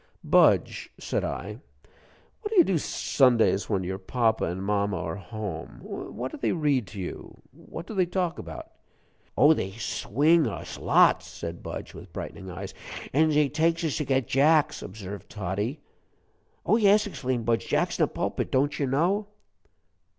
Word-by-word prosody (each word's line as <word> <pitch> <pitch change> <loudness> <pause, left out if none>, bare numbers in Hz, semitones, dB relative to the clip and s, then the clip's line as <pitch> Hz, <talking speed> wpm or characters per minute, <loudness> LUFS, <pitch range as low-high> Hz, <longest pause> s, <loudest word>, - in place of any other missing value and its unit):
"Budge," - - +3
said - - -2
I, - - -4 0.8
"what 420 - -4
do 440 - -3
you 355 - +8
do 190 - +1
Sundays 115 -10 +2
when 100 -4 0
your 95 +2 -4
papa 110 +2 +1
and 90 +3 -3
mama 100 -1 0
are 80 0 -3
home? 100 -5 -6
What 130 +2 -6
do - - -7
they - - +1
read 145 - +1
to 100 +2 -9
you, 90 - -7
what 165 - -9
do 220 - -8
they 185 -3 +2
talk 180 -1 -1
about?" 80 -4 -8 0.7
"Oh, 145 +4 +7
they 95 -10 -3
swing 145 +8 +2
us 105 - -6
lots!" - - +4
said 85 0 -7
Budge, - - -7
with - - -11
brightening 95 - -7
eyes. 95 +2 -7 0.4
"An' 155 +3 +4
zey 150 -1 +4
takes 165 +4 +1
us 160 -4 0
to 150 - -1
get 130 -2 +1
jacks," 150 +2 +3
observed 100 0 -8
Toddie. 105 - -3 0.8
"Oh, 220 - +4
yes!" 210 -1 +5
exclaimed 130 - -3
Budge; 115 0 0
"jacks - - 0
in - - +1
the - - +3
pulpit - - -3
don't 140 +2 +1
you 140 - +1
know?" 180 +10 +1
130 Hz, 165 wpm, -27 LUFS, 100-160 Hz, 0.8 s, you